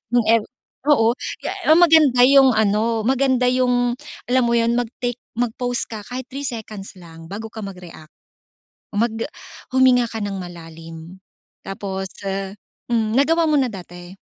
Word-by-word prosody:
yung 240 - +4
ev 230 -2 +4 0.4
oo. 230 -6 +4 0.3
Eh - - -2 0.2
ah 315 - +7
Maganda 310 -8 +6
yung 270 -1 +6
ano, 220 +1 +1
maganda 260 -1 +2
yung 245 -1 +1 0.4
alam 255 0 +4
mo 235 - +2
yun, 235 0 +2
mag-take 245 0 -4 0.2
mag-pause 245 +1 -2
ka 215 -2 -6
kahit 255 +1 -5
3 280 +1 -4
seconds 215 -5 -7
lang 165 -1 -13
bago 220 +2 -5
ka 220 - -9
mag-react. 180 -5 -10 0.8
Oh, - - 0
mag 235 - 0
ah - - -7 0.4
huminga 255 -2 +5
ka 225 - -4
ng 200 -1 -3
malalim. 165 0 -10 0.5
Tapos, 195 -1 -4 0.2
ah 195 0 -3 0.4
hmm, 220 -1 +1
nagawa 325 +4 +3
mo 300 - +3
na 255 -2 +1
dati? 175 -2 -10
230 Hz, 155 wpm, -21 LUFS, 195-255 Hz, 0.8 s, ah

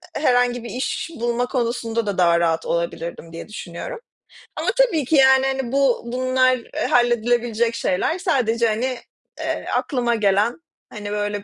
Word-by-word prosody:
herhangi 245 -3 +2
bir 235 - -7
iş 260 +5 -3
bulma 240 +1 -1
konusunda 235 -3 -2
da 200 -2 -2
daha 170 -1 +4
rahat 165 -1 0
olabilirdim 170 0 -3
diye 165 - -8
düşünüyorum. 210 - -7 0.6
Ama - - -1
tabii 350 - +3
ki 315 - +1
yani, 265 -1 +6
hani, 265 -2 -2
bu 275 -3 +2
bunlar 255 +1 +2 0.3
halledilebilecek 240 -1 +2
şeyler. 230 - 0
Sadece, 235 - +1
hani, 245 +4 -1 0.4
eee, - - -3
aklıma 240 -3 0
gelen 210 +6 +1 0.3
hani, 205 -1 -6
böyle 205 -1 -2
240 Hz, 140 wpm, -21 LUFS, 210-255 Hz, 0.6 s, yani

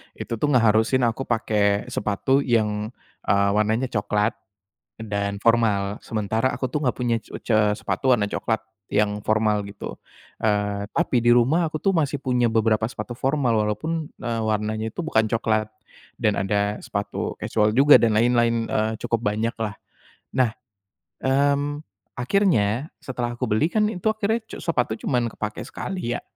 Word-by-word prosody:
itu 115 - -5
tuh 150 - +1
ngeharusin 115 +2 +3
aku 120 +3 -1
pakai 105 -3 +1
sepatu 105 +7 +1
yang, 110 -5 0 0.4
eee, 100 0 +3
warnanya 110 +5 +1
cokelat, 105 +1 +1 0.7
dan 100 -2 -2
formal, 105 -3 +2
sementara 110 +3 -1
aku 130 - -3
tuh 150 +4 -2
enggak 125 - 0
punya 120 -2 +1
c - - -18
e - - -5
ce 110 - +2 0.2
sepatu 115 +7 +1
warna 105 -4 +2
cokelat 110 +1 -1 0.3
yang 105 0 +1
formal 110 -1 +2
gitu, 100 - -8 0.4
eee, 105 -1 0
tapi 165 -6 +1
di - - +6
rumah 140 +8 +3
aku 155 - -3
tuh - - +2
masih 145 -4 +1
punya 125 -3 +1
beberapa 110 -1 +2
sepatu 125 - -6
formal, 135 -3 +1
walaupun, 155 +8 -2
eee, 115 -2 -3
warnanya 110 0 -1
itu - - -4
bukan 110 -8 +2
cokelat 110 -1 0 0.5
dan 105 -1 +3
ada 100 +2 0
sepatu 100 0 -3
kasual 105 -1 +1
juga 145 +2 +8
dan 115 -2 +3
lain-lain, 115 0 +2
eee, 110 +1 0
cukup 115 -1 -1
banyaklah. 110 +1 -1 0.6
Nah, 125 -4 +2 0.7
mmm, 145 +2 +1 0.4
akhirnya 130 - +2 0.2
setelah 120 -2 -3
aku 120 - -5
beli 110 +8 +2
kan 215 -1 +2
itu 190 +1 -3
akhirnya 220 +1 0
cu - - -8
sepatu 125 -9 0
cuman 120 -3 +1
kepakai 105 0 -5
sekali 180 -11 -4
ya, - - -5
115 Hz, 155 wpm, -23 LUFS, 105-130 Hz, 0.7 s, juga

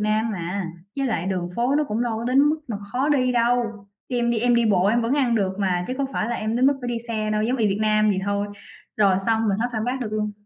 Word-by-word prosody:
Nam 215 +2 +1
mà, 180 0 -3 0.3
với 275 -1 0
lại 185 -7 -1
đường 180 -2 -2
phố 245 +4 +1
nó 300 - +2
cũng 225 -3 -2
đâu 235 -2 -1
có 230 - -5
đến 255 +2 +3
mức 310 - 0
mà 220 - -2 0.2
khó 265 +4 +1
đi 255 -4 +2
đâu, 235 -3 0 0.2
khi 250 - -2
em 235 0 +1
đi 235 - +1
em 240 +2 +3
đi 235 -1 +3
bộ 190 -2 +3
em 235 +3 +2
vẫn 230 +3 0
ăn 260 -5 +2
được 195 -4 +1
mà, 180 -3 0
chứ 255 - -2
có 275 - +1
phải 215 - -1
là 240 - -1
em 220 +2 -2
đến 255 +2 +4
mức 280 - +3
phải 245 - -4
đi 240 - -1
xe 215 -2 -1
đâu, 215 0 +1
giống 245 +4 0
y 220 -3 +2
Việt 195 - -1
Nam 215 0 +3
vậy 190 - 0
thôi." 200 0 -1 0.5
Rồi 195 -3 +4
xong, 225 -1 +2
mình 195 - +1
hết 240 - +1
phản 220 -1 -2
bác 255 +2 -2
được 215 -4 -4
luôn. 210 -1 -1
225 Hz, 300 wpm, -23 LUFS, 210-245 Hz, 0.5 s, đến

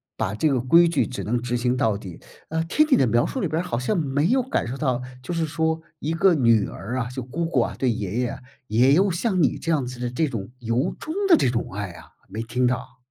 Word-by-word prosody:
把 100 +3 -2
这 155 +7 +2
个 130 -3 +1
规 165 +8 +5
矩 165 -4 +1
只 125 - -5
能 120 +3 -1
执 120 0 -1
行 125 +1 +1
到 110 -7 +1
底。 95 -5 -10 0.3
啊， 160 +1 0
听 300 - +3
你 - - +7
的 130 - +3
描 120 +2 +3
述 265 - -3
里 190 - 0
边 160 +2 -1
儿 - - -7
好 120 -9 -2
像 150 +10 0
没 145 0 +1
有 255 +4 +2
感 260 - -1
受 130 - -4
到， 130 -4 0 0.2
就 175 - -4
是 165 -1 0
说， 160 +1 -1 0.2
一 155 +3 -2
个 185 +2 +4
女 115 -6 +3
儿 125 +6 -5
啊， 120 - -2
就 125 0 -6
姑 165 +7 -3
姑 135 -7 +2
啊， - - -2
对 130 - +2
爷 105 +1 -3
爷， 125 -1 -2 0.3
也 125 +6 +4
有 195 +5 +4
像 185 +1 0
你 145 - +2
这 165 - -2
样 145 -5 +1
子 125 -1 -8
的 120 -1 -3
这 155 +5 0
种 115 -7 -5
由 120 +8 0
衷 315 - -5
的 340 -5 +7
这 125 - +2
种 115 -5 -3
爱 100 -2 -4
啊， 85 - -14 0.2
没 110 +4 -5
听 125 +2 0
到。 125 +1 -3
130 Hz, 285 characters per minute, -24 LUFS, 120-165 Hz, 0.3 s, 你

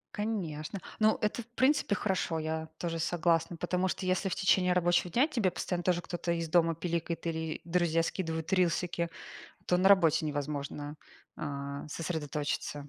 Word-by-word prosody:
Конечно, 195 -6 -3 0.2
ну, 215 0 +4
это 210 +3 0
в 230 - -14
принципе 265 -5 +3
хорошо, 190 -5 0
я 160 0 -3
тоже 165 -1 -3
согласна. 170 0 +1
Потому 180 +2 0
что 185 - -3
если 185 +1 +1
в - - -2
течение 185 -1 +3
рабочего 175 0 +2
дня 255 - +4
тебе 230 - +1
постоянно 175 0 -3
тоже 175 -1 +2
кто-то 175 0 -3
из 165 -1 -1
дома 165 0 +3
пиликает 170 0 -3
или 160 -1 -2
друзья 170 -1 +2
скидывают 165 0 -2
рилсики, 175 -1 +1 0.6
то 180 - +2
на 190 - +5
работе 165 -5 +5
невозможно, 145 0 -4 0.4
а, 140 0 -5
сосредоточиться. 150 -2 -3
170 Hz, 155 wpm, -31 LUFS, 160-185 Hz, 0.6 s, на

